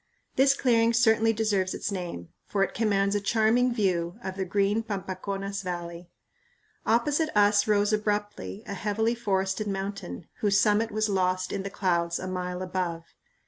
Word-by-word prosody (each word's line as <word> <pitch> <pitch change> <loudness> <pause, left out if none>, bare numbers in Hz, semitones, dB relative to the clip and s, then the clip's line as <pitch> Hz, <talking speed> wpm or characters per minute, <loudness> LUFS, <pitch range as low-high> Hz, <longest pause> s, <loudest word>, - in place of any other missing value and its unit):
This 270 +1 +5
clearing 230 -3 +3
certainly 225 -1 +4
deserves 205 -4 0
its - - -3
name, 175 - -5 0.2
for 195 -1 +1
it 195 - -2
commands 200 -3 +1
a 205 - 0
"charming 225 +4 +3
view" 185 -5 0
of 190 - -4
the 190 -1 -2
green 200 +3 +1
Pampaconas 195 -1 -4
Valley. 175 -1 -6 0.8
Opposite 290 +8 +2
us 205 0 +4
rose 210 0 +2
abruptly 210 0 -2
a - - -5
heavily 210 +4 0
forested 195 -2 -1
mountain, 195 - -5
whose 200 -1 +3
summit 215 +2 +3
was 215 0 0
lost 185 -2 0
in 200 - -2
the 195 - -4
clouds 170 -3 0
a 185 - -5
mile 180 0 -3
above. 180 -3 -4
200 Hz, 155 wpm, -27 LUFS, 185-220 Hz, 0.8 s, This